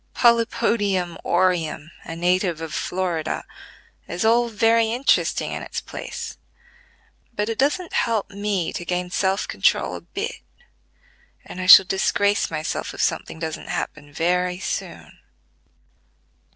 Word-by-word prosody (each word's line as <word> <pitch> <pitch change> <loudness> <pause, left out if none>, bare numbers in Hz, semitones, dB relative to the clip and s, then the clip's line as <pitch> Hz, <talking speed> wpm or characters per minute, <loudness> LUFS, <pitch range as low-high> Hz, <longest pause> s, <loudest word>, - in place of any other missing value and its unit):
"Polypodium 215 -6 +2
aureum, 175 -3 0
a 165 - -6
native 180 0 +1
of 160 -1 -6
Florida," 175 -4 -2 0.6
is 175 +4 -2
all 235 +2 +4
very 225 +1 +3
interesting 250 +4 +1
in - - -4
its - - -4
place; 465 -2 -7 1.0
but 210 +1 -1
it 225 - -3
doesn't 300 +6 0
help 225 -4 0
me 200 -4 -2
to - - -4
gain 180 0 -2
self 190 +2 0
control - - +1
a - - -7
bit, 440 +5 -5 1.0
and 185 - -7
I 185 - -3
shall 190 +1 +11
disgrace 200 +2 +1
myself 155 -1 -3
if - - -3
something - - -1
doesn't 160 -1 -5
happen 145 -1 -4
very 180 +4 0
soon." - - -5
185 Hz, 125 wpm, -23 LUFS, 175-225 Hz, 1.0 s, shall